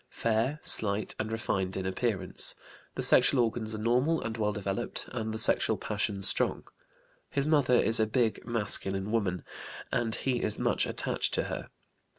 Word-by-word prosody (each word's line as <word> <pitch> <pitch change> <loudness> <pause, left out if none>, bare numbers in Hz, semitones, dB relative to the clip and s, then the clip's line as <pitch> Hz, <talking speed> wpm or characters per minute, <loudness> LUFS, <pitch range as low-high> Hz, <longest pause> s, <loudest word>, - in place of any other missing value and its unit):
Fair, 115 +6 -1
slight, 105 0 +4
and 110 +1 -3
refined 95 -4 -3
in 95 - -4
appearance. 95 -1 +1 0.4
The - - -3
sexual 140 - +5
organs 110 -1 -3
are - - -5
normal 125 +9 +1
and 115 0 -5
well 105 -2 -1
developed, 105 +2 -5
and 110 -2 -4
the 110 - -5
sexual 110 - +2
passions 100 -1 +1
strong. - - +2 0.7
His 140 -1 -2
mother 145 -5 +2
is 115 -1 +3
a 110 - +2
big 115 0 -1
masculine 105 -3 +1
woman, 100 -6 -1 0.5
and 115 -2 -1
he 125 -3 -2
is 105 - -1
much - - 0
attached - - -2
to - - 0
her. - - -7
110 Hz, 160 wpm, -28 LUFS, 105-120 Hz, 0.7 s, sexual